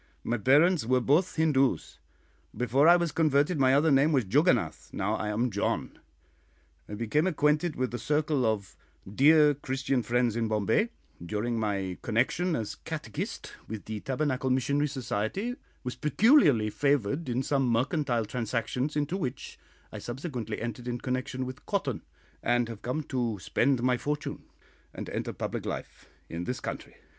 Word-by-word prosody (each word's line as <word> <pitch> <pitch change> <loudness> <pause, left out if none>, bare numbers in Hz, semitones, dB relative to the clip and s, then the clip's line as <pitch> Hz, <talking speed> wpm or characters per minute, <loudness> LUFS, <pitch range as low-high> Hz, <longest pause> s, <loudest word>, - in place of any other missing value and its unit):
"My 120 0 -1
parents 150 - +4
were 130 +3 +2
both 150 +9 +2
Hindoos. 135 - +1 0.6
Before 130 +5 +3
I 175 - +9
was 170 -2 0
converted 150 0 +2
my 130 0 +5
other 155 +2 +4
name 140 +3 +4
was 130 -6 +2
Juggonath; 115 - +1
now - - -1
I 105 - -2
am 115 +3 0
John. 100 - -2 0.9
I 105 - -5
became 115 - +1
acquainted 150 0 +1
with 130 -1 -2
a 120 - -3
circle 150 -2 +1
of 110 -4 -1 0.3
dear 150 +7 +5
Christian 135 -1 -1
friends 120 0 +1
in 115 -1 0
Bombay, 110 - +1 0.3
during 110 +6 -2
my 100 -4 -2
connection, 130 +10 +1
as 110 -5 -3
catechist, - - -6
with 110 -1 -7
the 110 -1 -5
Tabernacle 130 +1 -1
Missionary 140 +3 +1
Society, 135 - -2 0.3
was 125 -1 -4
peculiarly 150 - +4
favoured 140 +2 0
in 125 +2 0
some 135 -1 +1
mercantile 125 0 +1
transactions 125 +5 -2
into 150 +4 -1
which 135 -9 -5 0.3
I - - -7
subsequently 120 -4 -5
entered 120 +1 -5
in 120 0 -2
connection 130 +1 -3
with 130 0 -9
cotton, - - -1 0.4
and 120 0 +1
have 115 -3 -8
come 130 +6 -2
to 120 -6 -2
spend 120 +6 +1
my 125 -1 +3
fortune, 150 +3 -4 0.5
and - - -6
enter - - -3
public - - -4
life, - - -6 0.2
in 85 +1 -5
this 125 - -3
country. - - -6
130 Hz, 155 wpm, -28 LUFS, 115-150 Hz, 0.9 s, I